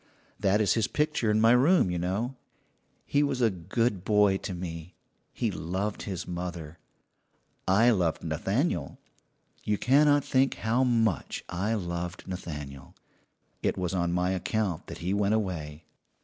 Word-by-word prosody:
"That 100 +2 +2
is 105 - +3
his 115 -2 +1
picture 150 -7 0
in 105 0 +3
my 115 +1 +5
room, 130 - +4
you 90 - -2
know. 100 +9 -2 0.7
He 145 - +2
was 140 -3 0
a 115 -3 +3
good 95 +3 -1
boy 105 -1 +4
to 95 - -5
me. 85 -1 -7 0.4
He - - -1
loved 95 +5 -3
his 95 -3 -5
mother. 85 -3 -6 0.9
I 110 +6 +5
loved 90 -7 0
Nathaniel 85 - -1 0.7
you 105 -1 0
cannot 145 +4 +4
think 130 0 +2
how 115 +4 +1
much 115 - 0
I 100 +6 -1
loved 85 -2 -4
Nathaniel. 75 -7 -7 0.7
It - - 0
was 90 0 -2
on 85 -2 0
my 90 +1 +1
account 95 -1 -2
that - - -7
he 95 - +1
went 100 +1 +2
away. 80 -7 -4
95 Hz, 150 wpm, -28 LUFS, 85-115 Hz, 0.9 s, my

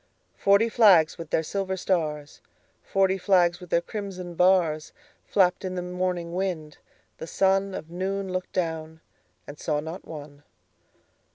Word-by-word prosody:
Forty 200 +3 +4
flags 195 -10 +5
with 165 -2 -7
their 160 - +1
silver 190 +2 -3
stars, 155 -6 -2 0.4
Forty 195 0 +1
flags 175 -2 +3
with 180 -2 -12
their 170 - +2
crimson 185 -3 -6
bars, 170 -3 +2 0.3
Flapped 180 -2 +2
in 185 -1 -4
the 180 - -3
morning 180 -1 -3
wind: 175 -5 -3 0.4
the - - -6
sunOf 195 -2 +1
noon 190 +2 -3
looked 185 0 -3
down, 160 -2 -3 0.4
and 145 - -10
saw 150 -2 -1
not 160 +5 -7
one. 145 -2 -10
180 Hz, 140 wpm, -26 LUFS, 160-190 Hz, 0.4 s, flags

